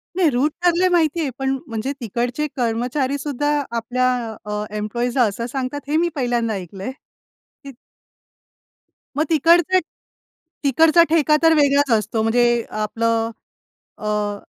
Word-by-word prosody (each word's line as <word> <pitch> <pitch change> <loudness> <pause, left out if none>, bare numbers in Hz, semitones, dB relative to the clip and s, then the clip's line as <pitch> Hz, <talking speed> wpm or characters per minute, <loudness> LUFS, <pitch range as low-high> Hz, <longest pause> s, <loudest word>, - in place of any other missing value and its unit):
नाही, 360 -4 +3
रूट 275 +3 +1
ठरले 355 +1 +3
माहिती 335 -2 +2
आहे. 290 - -1
पण 270 0 0
म्हणजे 230 +2 -3
तिकडचे 245 +6 -2
कर्मचारी 250 +4 -1
सुद्धा, 290 0 -2 0.3
आपल्या 245 +2 0 0.4
अ, 210 0 -3
एम्प्लॉइजला 240 +4 0
असं 220 +4 -5
सांगतात, 270 +2 -3
हे 300 - +1
मी 345 +1 +2
पहिल्यांदा 240 -4 0
ऐकलंय, 195 +4 -6 0.7
की 275 - -9 1.5
मग 305 - +2
तिकडचं 340 +3 +4 0.8
तिकडचा 320 +5 +5
ठेका 310 -2 +3
तर 325 0 +6
वेगळाच 285 -2 +3
असतो. 220 +2 -2
म्हणजे 240 +2 +3 0.2
आपलं 225 +1 -1 0.7
अ, - - -13
अ, 210 -1 -1
255 Hz, 130 wpm, -21 LUFS, 230-300 Hz, 1.5 s, तर